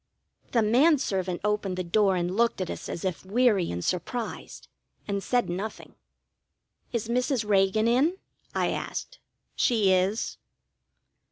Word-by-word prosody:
The 230 -2 +4
man 270 +9 +5
servant 185 -8 -2
opened 210 -3 -1
the 185 - -1
door 195 +2 +2
and 180 +1 -1
looked 235 -1 +2
at 185 - -2
us - - -7
as 170 - -5
if 185 -3 -2
weary 205 -2 +2
and 85 0 -4
surprised, 220 +7 -4 0.4
and 200 -1 -1
said 245 +4 +1
nothing. 195 +5 -5 1.0
"Is 230 -2 -2
Mrs. 250 -1 0
Reagan 200 +2 +3
in?" 280 +10 +3 0.4
I - - +1
asked. - - -5 0.4
"She 215 -6 +3
is." 190 +4 0
210 Hz, 140 wpm, -27 LUFS, 185-235 Hz, 1.0 s, man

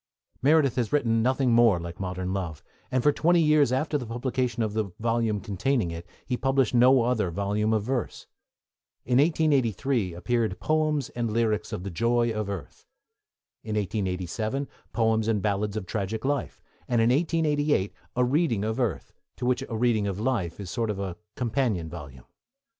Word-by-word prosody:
Meredith 140 -2 +4
has 120 -4 0
written 115 -6 +2
nothing 130 +1 +2
more 115 -6 +5
like 85 +1 -7
Modern 95 -1 -3
Love, 85 -6 -4 0.3
and 130 -1 0
for 145 - +5
twenty 170 +4 +3
years 150 -5 +4
after 150 +3 0
the 125 - -6
publication 120 0 -1
of 105 -1 -2
the 110 -1 0
volume 115 -2 0
containing 105 +1 -1
it 85 +1 -7 0.2
he 125 - -1
published 135 -1 +1
no 125 +1 +6
other 115 -6 +1
volume 100 +4 0
of 110 -2 +1
verse. 125 +1 -3 0.8
In 125 +1 +3
1883 135 - +1
appeared 110 +1 -1
Poems 155 -3 0
and 120 -1 -2
Lyrics 110 -1 0
of 90 - -4
the 100 - -5
Joy 115 +5 +1
of 105 -2 -3
Earth; 95 -6 -7 0.7
in 110 -1 -4
1887 105 +6 -2 0.2
Poems 110 -2 +1
and 110 -2 +2
Ballads 105 +1 -1
of 105 - -4
Tragic 105 +5 -3
Life; 140 -1 -2 0.2
and, 120 - +1
in 115 +1 +4
1888, 150 - +1 0.2
A 125 0 +3
Reading 130 - +1
of 110 +3 -2
Earth, 115 -8 -2 0.2
to 125 - -5
which 125 0 +1
A 115 - -3
Reading 110 -3 +2
of 100 0 -3
Life 110 -9 -1
is 100 - -6
a - - -6
sort 115 -3 -1
of 100 -3 -3 0.2
companion 115 -8 -1
volume. 70 -7 -10
115 Hz, 170 wpm, -26 LUFS, 100-130 Hz, 0.8 s, no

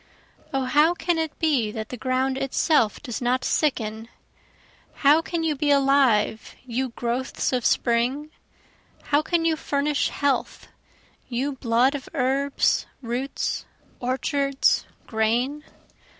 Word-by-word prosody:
O 270 -2 0
how 305 +6 +4
can 345 -1 0
it 320 -2 -3
be 280 -9 +1
that 220 0 -6
the - - -5
ground 255 +2 0
itself 270 -3 +1
does 245 -4 -5
not 245 +1 0
sicken? 225 -7 -1 1.0
How 300 +3 +7
can 330 0 -3
you 315 -2 0
be 290 +1 -1
alive 270 -6 +2
you 255 +1 -2
growths 240 +3 -2
of 250 -2 0
spring? 250 +8 +1 0.7
How 290 +1 +2
can 330 +1 0
you 325 -1 +3
furnish 295 -1 0
health 285 -1 -2 0.6
you 260 +3 -1
blood 250 0 +2
of 285 -2 -6
herbs, 275 +2 +1 0.2
roots, 245 +4 -3 0.3
orchards, 275 +2 +1 0.2
grain? 240 +7 0
270 Hz, 120 wpm, -24 LUFS, 240-290 Hz, 1.0 s, How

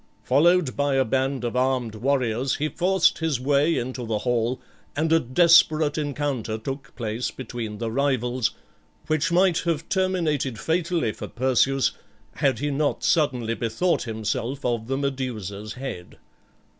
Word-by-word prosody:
Followed 160 +2 +3
by 140 -1 +1
a 135 0 +3
band 130 +1 0
of 120 0 -2
armed 125 -3 0
warriors 125 +1 0
he 150 - -1
forced 185 +2 +2
his 160 -6 0
way 145 +5 +2
into 125 +1 -3
the 110 -2 -1
hall, 120 +2 0 0.4
and 160 +2 +1
a 165 - +6
desperate 155 +1 +4
encounter 145 -7 -2
took 135 +5 -7
place 115 0 -3
between 115 -5 -6
the 115 0 -3
rivals, 125 -2 0 0.6
which 155 0 0
might 180 -1 +3
have 165 -2 -2
terminated 165 - 0
fatally 165 -7 0
for - - -7
Perseus, 130 +1 +2 0.5
had 135 -4 +2
he 145 +1 -2
not 145 +1 -1
suddenly 125 -8 +1
bethought 120 +11 0
himself 115 +4 -3
of 120 -2 -1
the 135 +1 -1
Medusa's 115 -7 -4
head. 125 -9 -7
135 Hz, 145 wpm, -24 LUFS, 120-150 Hz, 0.6 s, a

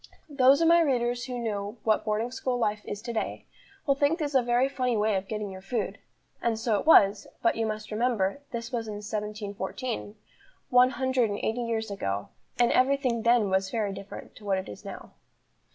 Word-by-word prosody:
Those 275 +1 +5
of 330 - +4
my 340 +1 +6
readers 245 -5 +1
who 250 -2 -4
know 210 -1 -3
what 215 -1 +2
boarding 220 +3 -1
school 255 -1 -2
life 215 -3 0
is 205 +1 -6
to 235 -1 -4
day, 220 - -3 0.4
will 275 - +4
think 285 +4 +2
this 300 -4 -3
a 265 - +5
very 245 +2 +2
funny 255 -4 -1
way 210 0 +2
of 190 0 -2
getting 210 -2 -4
your 190 0 -9
food; 210 +5 -3 0.4
and 230 -2 0
so 220 -2 +1
it - - -6
was, 200 -9 +6 0.2
but, 230 - +3
you 225 -1 0
must 215 0 -5
remember, 220 0 0
this 235 0 -5
was 230 -3 -2
in 210 - -5
1714, 210 +2 -4 0.6
one 250 0 +6
hundred 260 -3 +1
and 205 - -2
eighty 225 +3 0
years 225 -2 -2
ago, 100 - -3 0.3
and 240 -1 +4
every 270 +2 +4
thing 250 -4 -1
then 230 -3 +3
was 190 0 +1
very 210 -3 -1
different 195 +1 -9
to - - -14
what 195 -2 +1
it 190 - -4
is 105 - -10
now. - - -9
230 Hz, 205 wpm, -28 LUFS, 210-250 Hz, 0.6 s, my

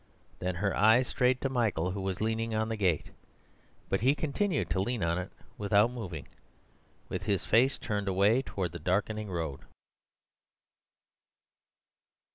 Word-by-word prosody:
Then 90 0 -2
her 100 +2 0
eyes 110 +5 +5
strayed 125 0 +2
to - - +1
Michael, 105 -9 0
who 100 +1 -4
was 95 -1 -2
leaning 110 +1 -1
on 110 +1 0
the 115 - -1
gate; 95 -7 0 0.8
but 95 - 0
he 135 +5 +4
continued 155 - 0
to 95 - +1
lean 115 -1 -1
on 85 +1 +1
it 90 - -5 0.3
without 105 +2 +3
moving, 95 - -6 0.8
with - - -4
his 100 -2 0
face 125 +5 +4
turned 105 -3 -3
away 100 +6 +3
towards 95 -9 -4
the 85 - -6
darkening 105 +5 -1
road. 80 -6 -3
105 Hz, 145 wpm, -30 LUFS, 90-115 Hz, 0.8 s, eyes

